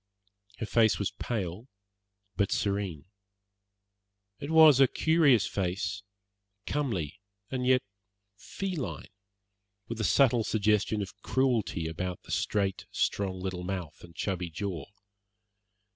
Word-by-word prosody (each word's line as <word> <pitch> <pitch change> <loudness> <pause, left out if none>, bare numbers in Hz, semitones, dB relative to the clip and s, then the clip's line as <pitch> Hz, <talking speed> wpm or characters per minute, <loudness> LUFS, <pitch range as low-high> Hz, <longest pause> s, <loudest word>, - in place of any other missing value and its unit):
Her - - -3
face 110 +1 +3
was 100 - -1
pale, 100 0 -4 0.7
but 100 0 +1
serene. 100 -7 -1 1.3
It 140 - -6
was 160 -4 +7
a 135 - +7
curious 150 -7 +4
face, 95 +2 -2 0.6
comely 95 - -2 0.3
and 125 -1 -1
yet 130 0 +4 0.5
feline, 170 - -5 0.8
with 115 -1 -4
a - - 0
subtle 120 0 +4
suggestion 105 0 +1
of 100 +1 -11
cruelty 120 -11 0
about 90 +3 -4
the - - -11
straight, 100 -2 -1
strong 95 -2 -1
little 90 -1 -4
mouth 90 -3 -5
and 85 -1 -14
chubby 90 0 -2
jaw. 85 -3 -4
100 Hz, 115 wpm, -29 LUFS, 95-125 Hz, 1.3 s, was